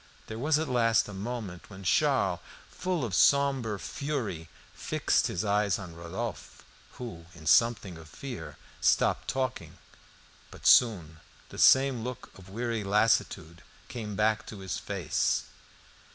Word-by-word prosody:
There 110 0 -7
was 150 +4 +2
at 160 0 -2
last 115 -3 +2
a 105 - -8
moment 100 -3 -6
when 95 -1 -11
Charles, - - +2 0.3
full 180 -7 -2
of 110 - -5
a - - -1
sombre 135 -6 +3
fury, 110 - -4 0.2
fixed - - 0
his 90 +4 -3
eyes 105 -1 +2
on 90 -4 -9
Rodolphe, 90 +6 -6 0.3
who, 85 -10 -8
in 80 -1 -13
something 100 0 +3
of 80 -1 -13
fear, 80 - -8 0.2
stopped - - +2
talking. 130 -1 -3 0.7
But - - -14
soon 85 -10 +4 0.3
the - - -9
same 130 -3 +5
look 125 0 -7
of 95 -1 -14
weary 115 +1 -3
lassitude 100 -5 +1 0.3
came 110 -4 -5
back 110 +1 +1
to 110 - -8
his 95 -1 -4
face. - - -1
110 Hz, 140 wpm, -29 LUFS, 95-125 Hz, 0.7 s, same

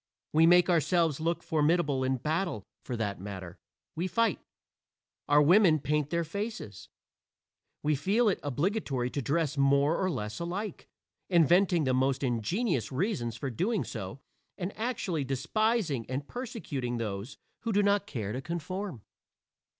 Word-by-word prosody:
We 160 +2 +6
make 175 0 +6
ourselves 165 -2 +2
look 165 +2 -1
formidable 150 -3 +2
in 130 0 +1
battle 155 - -1 0.2
for 125 - -4
that 100 -4 -3
matter, 95 -3 -7 0.4
we 175 +3 -1
fight. 225 -1 +1 0.9
Our 145 +1 +6
women 175 0 +6
paint 150 0 0
their 170 +1 0
faces. 165 - -6 0.9
We 150 - +2
feel 200 - +2
it 200 - +2
obligatory 145 - -1
to 140 - -2
dress 150 +1 0
more 140 +5 +3
or 185 - +2
less 105 - -4
alike, 180 +3 -4 0.4
inventing 175 0 +4
the 130 -2 +1
most 135 +1 +1
ingenious 130 - 0
reasons 130 - -1
for 135 -3 -3
doing 195 - 0
so 100 +1 -6 0.4
and 185 +2 -4
actually 215 - -2
despising 150 - 0
and 135 +2 -3
persecuting 145 - -4
those 110 +2 -4 0.2
who 230 - -2
do 205 0 +3
not 200 0 +2
care 105 -7 -4
to 130 - -3
conform. 175 - -5
155 Hz, 140 wpm, -30 LUFS, 130-185 Hz, 0.9 s, We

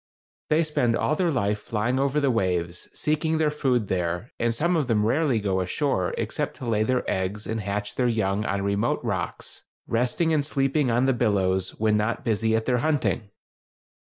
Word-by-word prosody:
They 155 +2 +3
spend 125 -7 +1
all 155 - +1
their 175 +1 +1
life 105 -8 0
flying 115 +5 -1
over 140 +2 +1
the 140 -2 +2
waves, 90 -5 -1
seeking 155 +1 0
their 155 -1 +2
food 125 -7 0
there, 90 +4 -2
and 120 0 +2
some 170 +10 +1
of 150 -5 +1
them 105 -3 +2
rarely 135 0 +2
go 95 -2 0
ashore, 95 - -1
except - - -2
to - - -7
lay 110 -2 +1
their 125 +3 0
eggs 95 +3 -2
and 110 0 -2
hatch 105 +1 -3
their 125 - +1
young 105 -3 0
on 100 -1 -1
remote 100 +1 0
rocks, - - -4 0.2
resting 125 +8 +1
and 150 -2 +2
sleeping 140 -1 +1
on 120 +2 +2
the 135 - +3
billows, 95 -5 0
when 105 -1 +3
not 105 +2 -1
busy 110 0 +1
at 110 0 0
their 125 -1 +2
hunting. 140 -7 0
115 Hz, 190 wpm, -25 LUFS, 100-135 Hz, 0.2 s, They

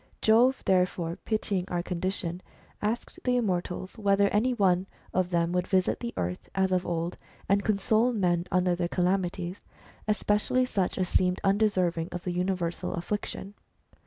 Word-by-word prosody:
Jove 240 +4 +4
therefore, 180 -3 +1
pitying 205 -4 0
our 175 -2 -2
condition, 180 -1 -2 0.4
asked 220 +3 -2
the 250 -1 +2
immortals 185 -3 -2
whether 200 -1 +3
any 220 +6 +2
one 190 -5 +2 0.3
of 185 -1 +1
them 170 -1 +1
would 180 0 0
visit 185 -2 +2
the 235 -1 -4
earth 90 +1 -3
as 190 -1 +2
of 185 -1 +1
old, 170 +1 -2 0.3
and 200 +1 +3
console 220 +3 +2
men 180 -6 +1
under 180 0 +3
their 175 0 -1
calamities, 180 0 -1 0.5
especially 210 +4 +2
such 195 -7 -1
as 185 - 0
seemed 180 +1 +2
undeserving 185 -5 +2
of 175 0 -5
the 180 - -2
universal 180 -1 -1
affliction. 195 +2 -4
185 Hz, 150 wpm, -28 LUFS, 175-205 Hz, 0.5 s, Jove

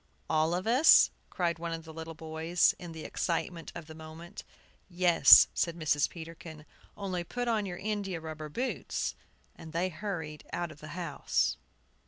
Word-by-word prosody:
"All 160 +2 +2
of 185 - -3
us?" 255 +8 +6 0.2
cried 170 -3 -1
one 170 0 -3
of 165 0 -6
the 160 - -10
little 165 0 -7
boys, 160 +2 +1
in 175 -2 -8
the 160 -1 -8
excitement 170 0 -3
of 170 - -7
the 155 - -11
moment. 160 +4 -10 0.5
"Yes," 175 -5 +7
said 170 -1 -1
Mrs. 150 -3 +1
Peterkin, 160 -2 -10 0.3
"only 185 -3 -3
put 245 +7 -4
on 215 -3 0
your 175 -1 -5
india 200 -4 -3
rubber 155 -1 -7
boots." 250 - -3 0.4
And 160 -1 -11
they 175 +3 0
hurried 160 -4 -5
out 170 -1 -3
of 150 - -14
the 155 +4 -9
house. 170 -5 0
165 Hz, 165 wpm, -30 LUFS, 160-180 Hz, 0.5 s, Yes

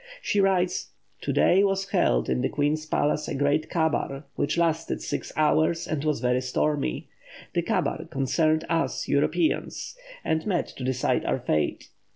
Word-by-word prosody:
She 205 - +1
writes: 185 -2 +1 0.3
"To - - -2
day 190 +3 +4
was 195 -1 0
held - - +2
in 65 0 0
the - - 0
Queen's 150 +2 0
palace 150 0 0
a - - -3
great 145 +3 +1
kabar, 155 -4 0
which 145 +3 -1
lasted 165 -1 0
six - - -4
hours 155 +2 +2
and 150 -2 -2
was 150 -6 0
very 125 0 +2
stormy. 135 - -1 0.4
The - - +2
kabar - - -1
concerned 155 +4 +1
us 165 0 -1
Europeans, 155 - 0 0.3
and 160 0 0
met 180 -4 +1
to 130 - -9
decide 130 0 0
our - - +1
fate. 75 -1 -1
155 Hz, 160 wpm, -26 LUFS, 140-170 Hz, 0.4 s, day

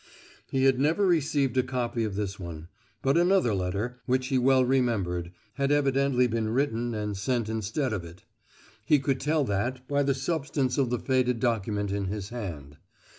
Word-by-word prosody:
He 135 -1 0
had 135 -1 +4
never 160 +8 +2
received 145 -6 +1
a - - +6
copy 125 -2 -2
of 105 -3 -3
this 100 -1 -3
one, 85 -2 -8 0.3
but 135 +5 +3
another 175 - +3
letter, 100 +7 -2
which 130 0 +1
he 130 - +2
well 130 0 +4
remembered, 100 -10 0 0.3
had 140 0 +1
evidently 140 -3 +3
been 115 -2 -1
written 120 -2 0
and 105 -1 -3
sent 115 +3 -1
instead 110 +4 -2
of 95 -5 -3
it; 85 +2 -12 0.6
he 150 +7 +4
could 135 -1 -1
tell 150 +2 +1
that 125 +4 -2
by 145 0 +1
the 140 -1 +1
substance 140 -2 -1
of 130 -3 +2
the 125 - 0
faded 125 -2 +1
document 105 -4 -1
in 100 0 -1
his 100 0 -4
hand. 80 - -7
125 Hz, 175 wpm, -27 LUFS, 105-135 Hz, 0.6 s, a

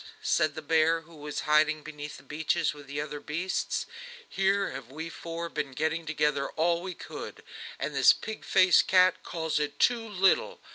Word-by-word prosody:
said 155 -1 +2
the 155 - -6
bear, 160 +1 +3
who 165 +1 -17
was 150 0 -5
hiding 155 0 +3
behind 150 -1 -7
the - - -15
beeches 155 +3 0
with 145 -1 -13
the 140 +1 -4
other 150 0 -4
beasts, 170 +6 -2 0.4
"here 195 +1 +1
have 120 - -8
we 160 +4 -6
four 170 0 -6
been 145 -5 -4
getting 160 +3 -1
together 150 -2 0
all 170 +1 +2
we 185 -1 -6
could, - - -8 0.3
and - - -3
this - - +7
pig 220 - -5
faced 185 -1 +5
cat 185 0 +4
calls 160 -2 -2
it 150 -1 -3
too 230 -2 +2
little! 195 -2 +2
160 Hz, 180 wpm, -28 LUFS, 150-170 Hz, 0.4 s, this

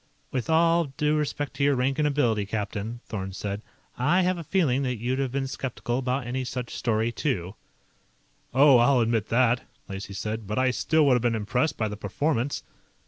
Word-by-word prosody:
"With 130 +1 -2
all 165 +1 +4
due 150 0 +2
respect 145 -1 -2
to 140 - 0
your 140 0 +4
rank 130 +3 0
and 150 - +3
ability, 115 -8 +1
captain," 105 +2 -4
Thorn 95 -3 -5
said, 100 +2 -4 0.4
"I 170 +9 +3
have 180 0 +1
a - - -5
feeling 145 -6 +1
that 125 -2 -1
you'd 125 +4 -1
have 135 -2 -1
been 135 +1 -1
skeptical 130 -2 -3
about 130 0 -1
any 130 +2 -2
such 125 -1 -5
story, 115 0 0
too." 100 - -2 1.0
"Oh, 135 -1 +6
I'll 125 +1 +4
admit 115 -2 +1
that," 120 0 +3 0.3
Lacey 100 0 -6
said. 110 +1 -4
"But 105 - -3
I 130 0 +3
still 155 +4 +2
would 135 - +5
have 125 - +2
been 120 -1 +1
impressed 125 +7 0
by 110 - 0
the 105 0 -6
performance." 125 +6 -1
125 Hz, 195 wpm, -26 LUFS, 110-140 Hz, 1.0 s, Oh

